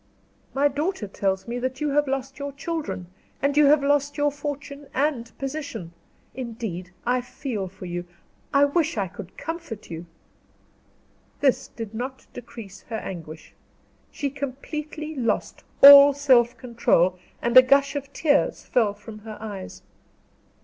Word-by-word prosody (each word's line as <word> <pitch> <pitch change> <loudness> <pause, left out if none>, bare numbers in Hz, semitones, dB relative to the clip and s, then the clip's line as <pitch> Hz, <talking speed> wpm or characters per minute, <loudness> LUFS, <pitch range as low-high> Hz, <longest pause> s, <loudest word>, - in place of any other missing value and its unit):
"My 280 +2 +4
daughter 290 - -2
tells 190 0 -2
me 240 +1 -3
that 260 +1 -3
you 300 -1 0
have 290 +1 +2
lost 270 +1 -3
your 280 0 -5
children, 295 - -4 0.3
and 280 +1 +1
you 295 -1 +6
have 285 0 +5
lost 285 0 +1
your 290 0 +2
fortune 290 0 -6
and 260 -5 0
position. 275 - -5 0.4
Indeed 225 -8 -5 0.2
I 250 +1 +2
feel 245 -5 -5
for 190 0 -11
you. 175 0 -5 0.4
I 280 0 +5
wish 290 -2 0
I 195 -2 0
could 185 +1 -11
comfort 325 - -6
you!" 165 +1 -7 1.3
This 270 -3 +2
did 225 -2 -8
not 255 +4 -5
decrease 220 -5 -10
her 225 - -2
anguish. 160 -6 -8 0.6
She 280 -2 -3
completely 300 +3 -5
lost 230 -5 -2 0.2
all 280 0 +11
self 255 -4 +4
control, 230 -7 +2 0.2
and 235 +1 -1
a 255 - +13
gush 275 +2 +3
of 280 -1 -4
tears 285 -2 +1
fell 215 -5 +1
from 215 +1 -11
her 215 0 -9
eyes. 205 -3 -8
260 Hz, 145 wpm, -24 LUFS, 215-285 Hz, 1.3 s, a